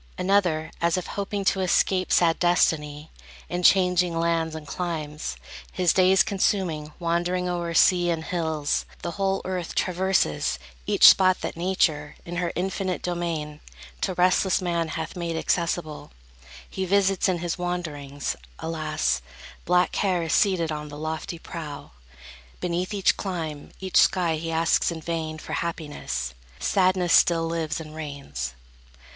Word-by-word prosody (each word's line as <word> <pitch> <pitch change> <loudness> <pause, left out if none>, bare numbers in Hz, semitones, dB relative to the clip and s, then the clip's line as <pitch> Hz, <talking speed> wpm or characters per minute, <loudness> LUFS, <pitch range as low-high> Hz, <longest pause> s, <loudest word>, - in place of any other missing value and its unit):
Another, 180 -5 +1
as 170 +1 +2
if 180 - -3
hoping 200 0 -3
to 195 - +2
escape 185 0 +2
Sad 165 -2 +4
destiny, 155 -3 +1 0.4
in 175 0 -2
changing 180 -2 +4
lands 165 -1 0
and 155 -1 -7
climes 150 - -4 0.4
His 180 -3 +2
days 185 0 +5
consuming, 180 -6 -1
wandering 175 +1 0
o'er 170 -1 -2
sea 175 0 +5
And 165 -1 -1
hills, 160 -4 -1 0.2
the 170 - -2
whole 195 +1 -1
earth 185 -3 -4
traverses; 185 - +1 0.3
each - - +7
spot 185 -1 +6
That - - -4
Nature, 160 -4 0
in 175 +1 -5
her 175 -1 -1
infinite 185 0 -2
domain, 165 -4 -3 0.4
To 185 - -1
restless 185 +1 +3
man 170 -3 -1
hath 160 0 -5
made 170 -2 -3
accessible, 165 -2 -1 0.6
He 190 - -4
visits 195 0 +2
in 180 - +1
his 175 0 -3
wanderings. 150 -6 -3 0.2
Alas, 155 - -1 0.4
Black 180 +1 +3
care 185 -4 0
is 160 - -1
seated 180 -5 +2
on 150 0 -5
the 145 - -9
lofty 160 +2 -4
prow; 160 -3 -8 0.7
Beneath 180 +2 -2
each 200 -2 +2
clime, 160 -6 -4
each 190 -1 -1
sky, 175 -4 +4
he 165 +1 -4
asks 165 0 +2
in 170 -2 -4
vain 160 -1 -3
For - - -7
happiness; 145 - -3 0.2
sadness 185 -2 +2
still 165 -1 +5
lives 165 0 -2
and 155 -1 -9
reigns. 140 - -6
170 Hz, 140 wpm, -25 LUFS, 155-180 Hz, 0.7 s, each